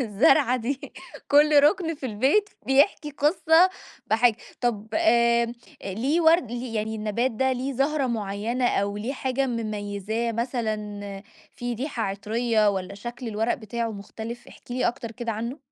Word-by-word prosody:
الزرعة 250 Hz, +3 st, +4 dB
دي 255 Hz, +3 st, -4 dB, 0.4 s
كل 295 Hz, 0 st, +6 dB
ركن 330 Hz, +1 st, +3 dB
في 275 Hz, -3 st, -6 dB
البيت 270 Hz, -, +2 dB, 0.2 s
بيحكي 290 Hz, +3 st, +3 dB
قِصّة 320 Hz, +4 st, +4 dB, 0.4 s
بحاجة، 225 Hz, 0 st, +3 dB, 0.2 s
طب 225 Hz, -4 st, -1 dB
آآ 235 Hz, -7 st, +3 dB, 0.3 s
ليِه 250 Hz, -, 0 dB
ورد 320 Hz, -6 st, +4 dB
يعني 225 Hz, -3 st, -3 dB
النبات 215 Hz, +4 st, 0 dB
ده 265 Hz, +4 st, +1 dB
ليِه 260 Hz, +2 st, -2 dB
زهرة 275 Hz, +1 st, +1 dB
معيّنة 225 Hz, +2 st, -1 dB
أو 200 Hz, +1 st, 0 dB
ليِه 230 Hz, +6 st, -3 dB
حاجة 265 Hz, 0 st, -1 dB
مميزاه 215 Hz, 0 st, -3 dB
مثلًا، 210 Hz, -4 st, -3 dB, 0.3 s
فيه 245 Hz, -1 st, -4 dB
ريحة 255 Hz, -1 st, -3 dB
عطريّة 215 Hz, +2 st, +1 dB
والّا 190 Hz, 0 st, -4 dB
شكل 240 Hz, +3 st, -7 dB
الورق 225 Hz, +2 st, 0 dB
بتاعه 235 Hz, +1 st, -4 dB
مختلف؟ 220 Hz, +3 st, -8 dB
احكِ -, -, -17 dB
لي 250 Hz, +1 st, +1 dB
أكتر 230 Hz, -1 st, -5 dB
كده 235 Hz, 0 st, -4 dB
عنه. 235 Hz, +7 st, -4 dB
235 Hz, 140 wpm, -25 LUFS, 215-270 Hz, 0.4 s, كل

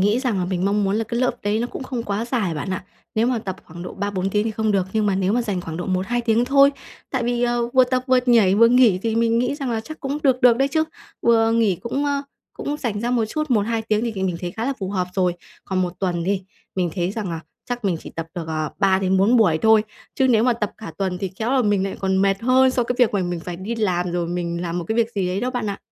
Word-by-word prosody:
nghĩ 205 Hz, +4 st, +3 dB
rằng 245 Hz, -7 st, 0 dB
là 180 Hz, -, 0 dB
mình 180 Hz, 0 st, -2 dB
mong 205 Hz, +1 st, +2 dB
muốn 195 Hz, +1 st, +1 dB
là 225 Hz, -, 0 dB
cái 235 Hz, +2 st, -2 dB
lớp 255 Hz, -, +3 dB
đấy 205 Hz, +1 st, 0 dB
nó 240 Hz, -, 0 dB
cũng 255 Hz, -, -7 dB
không 255 Hz, -2 st, -4 dB
quá 205 Hz, 0 st, -2 dB
dài, 230 Hz, -8 st, -1 dB
bạn 150 Hz, +5 st, -4 dB
ạ. 185 Hz, -, -3 dB, 0.3 s
Nếu 220 Hz, +2 st, +2 dB
mà 250 Hz, -1 st, +1 dB
tập 190 Hz, -4 st, -5 dB
khoảng 175 Hz, +2 st, -10 dB
độ 180 Hz, -, -7 dB
3-4 195 Hz, -1 st, -2 dB
tiếng 210 Hz, +1 st, +1 dB
thì 225 Hz, -, -1 dB
không 220 Hz, 0 st, 0 dB
được 190 Hz, -2 st, +1 dB
nhưng 215 Hz, -1 st, +1 dB
mà 200 Hz, -, +2 dB
nếu 190 Hz, +1 st, +1 dB
mà 240 Hz, +2 st, +2 dB
dành 205 Hz, -5 st, -2 dB
khoảng 165 Hz, -2 st, -6 dB
độ 175 Hz, -, -4 dB
1-2 190 Hz, +6 st, 0 dB
tiếng 230 Hz, 0 st, +2 dB
thôi, 275 Hz, +2 st, +5 dB, 0.4 s
tại 260 Hz, -3 st, -1 dB
vì, 240 Hz, 0 st, 0 dB
ờ, 240 Hz, -1 st, +1 dB
vừa 255 Hz, +1 st, +5 dB
tập 255 Hz, 0 st, 0 dB
vừa 255 Hz, -1 st, +4 dB
nhảy 225 Hz, -6 st, +5 dB
vừa 230 Hz, +3 st, +6 dB
nghỉ 240 Hz, -6 st, +5 dB
thì 225 Hz, -1 st, 0 dB
mình 230 Hz, 0 st, +2 dB
nghĩ 250 Hz, +3 st, 0 dB
rằng 275 Hz, -4 st, -3 dB
là 225 Hz, -1 st, -1 dB
chắc 310 Hz, +8 st, -10 dB
cũng 280 Hz, +1 st, -2 dB
được 260 Hz, -3 st, +3 dB
được 245 Hz, -2 st, +6 dB
đấy 270 Hz, +2 st, +2 dB
chứ. 315 Hz, +3 st, +1 dB, 0.4 s
Vừa 225 Hz, -1 st, +4 dB
nghỉ 225 Hz, -5 st, +2 dB
cũng, 245 Hz, -, -3 dB
ơ, 285 Hz, -1 st, 0 dB, 0.3 s
cũng 290 Hz, -, -4 dB
rảnh 225 Hz, -8 st, -3 dB
ra 240 Hz, +2 st, -1 dB
một 240 Hz, -2 st, +2 dB
chút, 305 Hz, +7 st, -3 dB
1-2 225 Hz, 0 st, +1 dB
tiếng 215 Hz, -1 st, 0 dB
thì 235 Hz, -1 st, -1 dB
mình 190 Hz, -2 st, -2 dB
mình 180 Hz, -2 st, -2 dB
thấy 175 Hz, -, -3 dB
khá 225 Hz, +5 st, -4 dB
là 275 Hz, -, 0 dB
phù 190 Hz, -1 st, -4 dB
hợp 185 Hz, -2 st, -1 dB
rồi. 180 Hz, -2 st, +1 dB, 0.3 s
Còn 190 Hz, -1 st, 0 dB
1 180 Hz, -1 st, -2 dB
tuần 175 Hz, -3 st, -1 dB
đi, 195 Hz, +1 st, 0 dB, 0.3 s
mình 180 Hz, -3 st, 0 dB
thấy 180 Hz, -1 st, -1 dB
rằng 205 Hz, -3 st, -4 dB
là 165 Hz, -1 st, -4 dB, 0.3 s
chắc 245 Hz, -2 st, -4 dB
mình 185 Hz, -4 st, +1 dB
chỉ -, -, -10 dB
tập 165 Hz, -1 st, -5 dB
được, 170 Hz, -3 st, -5 dB
à, 155 Hz, -2 st, -2 dB
3 190 Hz, -1 st, +3 dB
đến 190 Hz, 0 st, +1 dB
4 205 Hz, +6 st, +4 dB
buổi 180 Hz, -9 st, +4 dB
thôi, 220 Hz, -1 st, +6 dB, 0.3 s
chứ 265 Hz, -1 st, +2 dB
nếu 230 Hz, -2 st, +4 dB
mà 250 Hz, -, +4 dB
tập 215 Hz, -3 st, -2 dB
cả 220 Hz, -, -8 dB
tuần 190 Hz, -2 st, -1 dB
thì 195 Hz, -, -2 dB
khéo 225 Hz, +2 st, -1 dB
là 265 Hz, -2 st, +3 dB
mình 205 Hz, -3 st, +2 dB
lại 195 Hz, -, -4 dB
còn 190 Hz, -1 st, +1 dB
mệt 195 Hz, 0 st, +2 dB
hơn 260 Hz, +2 st, +4 dB
so 255 Hz, -1 st, +1 dB
cái 245 Hz, +1 st, -2 dB
việc 245 Hz, -3 st, +4 dB
mà 195 Hz, -, +1 dB
mình 175 Hz, -1 st, -3 dB
phải 175 Hz, +1 st, -6 dB
đi 195 Hz, +6 st, -4 dB
làm 180 Hz, -5 st, 0 dB
rồi 175 Hz, -1 st, -1 dB
mình 170 Hz, 0 st, -3 dB
làm 175 Hz, 0 st, -2 dB
một 175 Hz, -, -4 dB
cái 220 Hz, -, 0 dB
việc 230 Hz, -1 st, +2 dB
gì 190 Hz, -3 st, 0 dB
ấy 185 Hz, +2 st, -1 dB
đó, 250 Hz, +2 st, -1 dB
bạn 245 Hz, -4 st, -3 dB
ạ. 200 Hz, -, -5 dB
215 Hz, 300 wpm, -22 LUFS, 185-240 Hz, 0.4 s, vừa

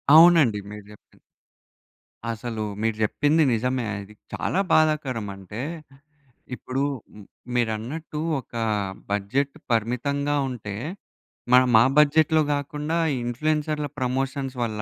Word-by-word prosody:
అవునండి 160 Hz, -10 st, +7 dB
మీరు 105 Hz, -1 st, -9 dB
చెప్పింది. 105 Hz, -, -19 dB, 1.1 s
అసలూ 115 Hz, -1 st, -4 dB, 0.2 s
మీరు 115 Hz, -1 st, 0 dB
చెప్పింది 150 Hz, +8 st, +2 dB
నిజమే. 125 Hz, +2 st, 0 dB
అది 100 Hz, +1 st, -10 dB, 0.2 s
చాలా 190 Hz, -, -1 dB
బాధాకరం. 150 Hz, -9 st, +2 dB
అంటే 100 Hz, +4 st, -8 dB, 0.9 s
ఇప్పుడూ 130 Hz, +3 st, -3 dB, 0.3 s
ఉమ్ 105 Hz, -, -12 dB, 0.3 s
మీరన్నట్టు, 120 Hz, +7 st, -2 dB, 0.2 s
ఒకా 115 Hz, -2 st, -5 dB, 0.5 s
బడ్జెట్ 130 Hz, +8 st, -1 dB, 0.2 s
పరిమితంగా 135 Hz, +6 st, 0 dB
ఉంటే, 105 Hz, -5 st, -6 dB, 0.8 s
మనం 125 Hz, -1 st, +6 dB
ఆ -, -, +4 dB
బడ్జెట్‌లో 155 Hz, +1 st, +5 dB
గాకుండా, 150 Hz, +3 st, -2 dB, 0.2 s
ఈ -, -, 0 dB
ఇన్‌ఫ్లుయెన్సర్‌ల 150 Hz, +4 st, -1 dB
ప్రమోషన్స్ 135 Hz, +1 st, -2 dB
వల్ల, 110 Hz, -2 st, -3 dB
130 Hz, 105 wpm, -24 LUFS, 115-150 Hz, 1.1 s, అవునండి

